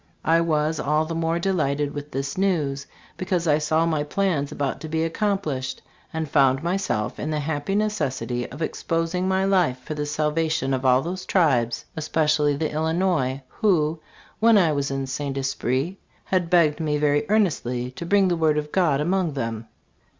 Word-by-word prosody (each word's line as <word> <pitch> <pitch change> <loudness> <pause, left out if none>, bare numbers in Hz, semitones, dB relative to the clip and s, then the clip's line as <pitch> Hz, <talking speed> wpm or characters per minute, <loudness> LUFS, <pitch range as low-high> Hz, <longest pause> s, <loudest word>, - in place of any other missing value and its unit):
I 165 +1 +4
was 155 -1 0
all 150 +2 +1
the 165 - -4
more 165 0 0
delighted 150 -6 0
with 145 0 -6
this 135 0 -3
news 150 -8 0 0.3
because 180 -2 -1
I 150 0 +4
saw 160 +2 +1
my 160 -3 0
plans 155 -3 -1
about 140 -1 -3
to 160 - -6
be 160 +1 0
accomplished, 165 - -2 0.3
and 160 -1 -3
found 135 -1 +3
myself 170 - -1
in 150 - -3
the 155 -1 -1
happy 150 +5 -2
necessity 135 -12 -1
of 145 +6 -5
exposing 165 +3 -1
my 190 0 +1
life 180 -10 +2
for 130 +4 -7
the 150 -1 -3
salvation 150 -1 0
of 130 0 -2
all 130 +1 +4
those 185 +2 -4
tribes, 130 -10 +1
especially 150 -2 +1
the 155 +2 -2
Illinois, 160 -4 0
who, 165 - +1 0.4
when 225 0 +6
I 170 -5 +4
was 140 -1 -1
at 135 0 -3
St. 140 +1 -3
Esprit, 135 +5 -1 0.3
had 180 -3 0
begged 165 -4 +4
me 150 -2 0
very 145 0 +2
earnestly 125 - 0
to 130 - -8
bring 195 +2 +3
the 175 - +1
word 160 -2 +2
of 150 0 -3
God 160 -7 +2
among 175 0 0
thsm." 115 -4 -3
155 Hz, 175 wpm, -24 LUFS, 140-175 Hz, 0.4 s, when